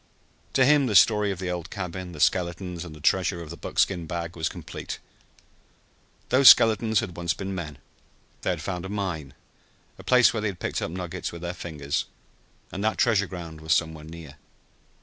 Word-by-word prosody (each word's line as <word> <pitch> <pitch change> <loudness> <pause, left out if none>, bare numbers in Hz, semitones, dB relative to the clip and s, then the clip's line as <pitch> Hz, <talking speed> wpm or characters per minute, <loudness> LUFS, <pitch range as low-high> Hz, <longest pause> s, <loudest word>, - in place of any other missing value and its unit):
To 130 - +4
him 140 -1 +4
the 105 - -1
story 105 +2 +5
of 95 - -2
the 90 -1 -3
old 90 -2 -5
cabin, 90 -1 -5
the 80 - -10
skeletons 90 +1 0
and 80 -3 -9
the - - -12
treasure 90 +2 +1
of 80 - -10
the - - -6
buckskin 85 -1 0
bag 85 -1 -4
was 80 -1 -1
complete. - - -7 1.3
Those 130 +1 +8
skeletons 110 -1 +5
had 90 - -6
once 85 -1 -1
been 95 0 -5
men. 80 -6 -6 0.6
They - - -1
had - - -2
found 90 -2 -4
a 95 - -6
mine 90 -9 -4 0.6
a - - -10
place 125 -1 +5
where 110 - -2
they 110 - 0
had 95 -4 -5
picked - - -2
up - - -2
nuggets 90 +1 -5
with 85 0 -9
their 85 0 -3
fingers. 75 -5 -3 0.7
And 95 - -4
that 110 - +1
treasure 105 -4 +3
ground 85 -4 -8
was 80 0 +2
somewhere 80 -2 -2
near. 80 -3 -11
90 Hz, 190 wpm, -26 LUFS, 85-100 Hz, 1.3 s, Those